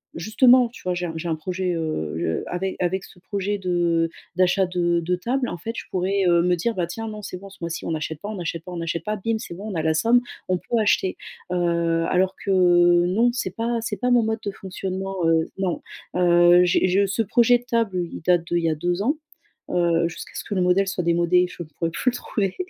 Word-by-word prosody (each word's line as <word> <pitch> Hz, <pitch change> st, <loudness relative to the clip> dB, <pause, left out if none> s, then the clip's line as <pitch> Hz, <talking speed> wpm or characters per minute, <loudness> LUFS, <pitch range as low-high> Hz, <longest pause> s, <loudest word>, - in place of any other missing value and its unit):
justement, 245 Hz, +7 st, +5 dB
tu 240 Hz, -, -14 dB
vois, 180 Hz, 0 st, 0 dB
j'ai 175 Hz, 0 st, -2 dB
un 165 Hz, -, -5 dB
j'ai 165 Hz, +1 st, -4 dB
un 160 Hz, -, +1 dB
projet, 180 Hz, +3 st, -3 dB
heu, 155 Hz, -, -3 dB
je 80 Hz, -1 st, -1 dB
avec, 185 Hz, +2 st, -3 dB
avec 185 Hz, +2 st, -1 dB
ce 180 Hz, -, -17 dB
projet 200 Hz, +2 st, -2 dB
de 175 Hz, -3 st, +1 dB, 0.3 s
d'achat 185 Hz, +1 st, +3 dB
de 175 Hz, -1 st, +1 dB
de 180 Hz, +2 st, 0 dB
table, 250 Hz, +8 st, -1 dB
en -, -, -5 dB
fait, 225 Hz, -, -5 dB
je -, -, -5 dB
pourrais, 190 Hz, +1 st, 0 dB
heu, 170 Hz, -1 st, +4 dB
me 180 Hz, 0 st, +3 dB
dire: 225 Hz, +7 st, -1 dB
«Bah, 180 Hz, -, 0 dB
tiens, 225 Hz, +6 st, -5 dB
non, 215 Hz, -1 st, -6 dB
c'est 180 Hz, -, -6 dB
bon 195 Hz, +1 st, -11 dB
ce 195 Hz, -, -16 dB
mois-ci 170 Hz, 0 st, -4 dB
on -, -, -2 dB
n'achète 155 Hz, -1 st, -3 dB
pas, 205 Hz, -, -5 dB
on 215 Hz, -, -4 dB
n'achète 165 Hz, -3 st, -4 dB
pas, 180 Hz, -, -9 dB
on -, -, -5 dB
n'achète 165 Hz, -1 st, -3 dB
pas: 215 Hz, -, -1 dB
bim, 220 Hz, +2 st, -1 dB
c'est 175 Hz, -6 st, -7 dB
bon, 210 Hz, +3 st, -6 dB
on -, -, -5 dB
a 160 Hz, -, 0 dB
la 160 Hz, 0 st, +1 dB
somme, 230 Hz, +9 st, +4 dB, 0.3 s
on 185 Hz, -, +2 dB
peut 235 Hz, -, -2 dB
acheter», 205 Hz, -3 st, +1 dB, 0.3 s
heu, 170 Hz, -2 st, +1 dB
alors 185 Hz, +1 st, +1 dB
que 200 Hz, -, -1 dB
non, 175 Hz, +4 st, +4 dB
c'est 190 Hz, -7 st, -3 dB
pas 230 Hz, +1 st, -1 dB
c'est 210 Hz, -2 st, -3 dB
pas 250 Hz, 0 st, 0 dB
mon 245 Hz, -, +5 dB
mode 220 Hz, 0 st, -1 dB
de 200 Hz, -, -1 dB
fonctionnement, 190 Hz, 0 st, -5 dB
heu, 165 Hz, 0 st, +3 dB
non. 190 Hz, -2 st, -1 dB, 0.3 s
Heu, 175 Hz, 0 st, +6 dB
j'ai 180 Hz, +1 st, +3 dB
je 195 Hz, +2 st, +3 dB
ce 205 Hz, +4 st, 0 dB
projet 240 Hz, +3 st, +4 dB
de -, -, -18 dB
table, 230 Hz, -6 st, 0 dB
il -, -, -7 dB
date 175 Hz, 0 st, +2 dB
d'il 175 Hz, -, +2 dB
y 165 Hz, -, +2 dB
a 155 Hz, -, 0 dB
2 175 Hz, +4 st, -1 dB
ans, 285 Hz, +9 st, +1 dB, 0.5 s
heu, 170 Hz, -1 st, +2 dB
jusqu'à 170 Hz, -, -9 dB
ce -, -, -4 dB
que -, -, -5 dB
le 185 Hz, -, +1 dB
modèle 185 Hz, +2 st, +3 dB
soit 185 Hz, -2 st, -2 dB
démodé, 170 Hz, +1 st, +3 dB
je 175 Hz, -, -7 dB
pourrai 160 Hz, +1 st, -4 dB
plus 250 Hz, +9 st, 0 dB
le -, -, -7 dB
trouver, 195 Hz, -6 st, -2 dB
180 Hz, 245 wpm, -23 LUFS, 170-205 Hz, 0.5 s, Heu